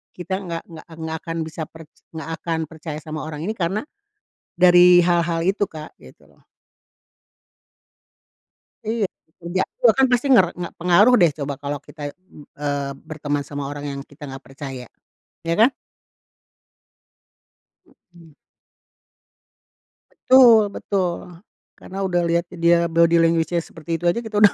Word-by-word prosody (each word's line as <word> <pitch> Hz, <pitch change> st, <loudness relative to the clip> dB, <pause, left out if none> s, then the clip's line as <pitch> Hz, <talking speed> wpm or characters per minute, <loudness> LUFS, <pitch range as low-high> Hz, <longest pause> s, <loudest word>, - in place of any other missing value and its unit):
kita 190 Hz, +1 st, -4 dB
nggak 170 Hz, -4 st, -5 dB
nggak 160 Hz, -, -11 dB, 0.2 s
nggak 160 Hz, 0 st, -3 dB
akan 165 Hz, +1 st, -6 dB
bisa 160 Hz, 0 st, -6 dB
per 165 Hz, 0 st, -13 dB, 0.3 s
nggak 160 Hz, 0 st, -6 dB
akan 165 Hz, -1 st, -2 dB
percaya 155 Hz, -1 st, -7 dB
sama 155 Hz, -1 st, -6 dB
orang 155 Hz, 0 st, -6 dB
ini 210 Hz, -, -2 dB
karena 200 Hz, +1 st, -2 dB, 0.7 s
dari 180 Hz, 0 st, +7 dB
hal-hal 170 Hz, -1 st, +1 dB
itu, 195 Hz, +2 st, +1 dB
Kak, 155 Hz, -1 st, -10 dB
gitu -, -, -17 dB
loh. -, -, -26 dB, 2.5 s
Iya, 225 Hz, -2 st, 0 dB, 0.3 s
kerjaku 185 Hz, -, -4 dB
kan 270 Hz, -, +5 dB
pasti 245 Hz, +2 st, +2 dB
nger 190 Hz, -7 st, +7 dB
nggak 175 Hz, -1 st, -6 dB
pengaruh 180 Hz, +8 st, +5 dB
deh 170 Hz, -4 st, +5 dB
coba 140 Hz, 0 st, -3 dB
kalau 145 Hz, 0 st, -4 dB
kita, 155 Hz, -, -14 dB
mmm, 185 Hz, -5 st, -17 dB
eee, 145 Hz, -1 st, -2 dB, 0.2 s
berteman 145 Hz, -2 st, -2 dB
sama 145 Hz, 0 st, -6 dB
orang 145 Hz, 0 st, -6 dB
yang 140 Hz, -, -6 dB
kita 145 Hz, +1 st, -15 dB
nggak 135 Hz, 0 st, -9 dB
percaya, 135 Hz, -2 st, -8 dB, 0.6 s
ya 165 Hz, -, 0 dB
kan? 245 Hz, +5 st, +5 dB, 2.1 s
Mhm. 170 Hz, -3 st, -21 dB, 1.8 s
Betul 245 Hz, -4 st, +6 dB
betul, 185 Hz, -4 st, -1 dB, 0.6 s
karena 195 Hz, +1 st, -7 dB
udah 175 Hz, -2 st, +1 dB
liat 170 Hz, +1 st, +1 dB
dia 170 Hz, 0 st, +3 dB
body 170 Hz, +1 st, +4 dB
language-nya 165 Hz, +1 st, +1 dB
seperti 165 Hz, +1 st, -5 dB
itu 175 Hz, -, -5 dB
aja 175 Hz, -, 0 dB
kita 215 Hz, -1 st, -4 dB
udah 205 Hz, -, +7 dB
170 Hz, 135 wpm, -22 LUFS, 155-180 Hz, 2.5 s, dari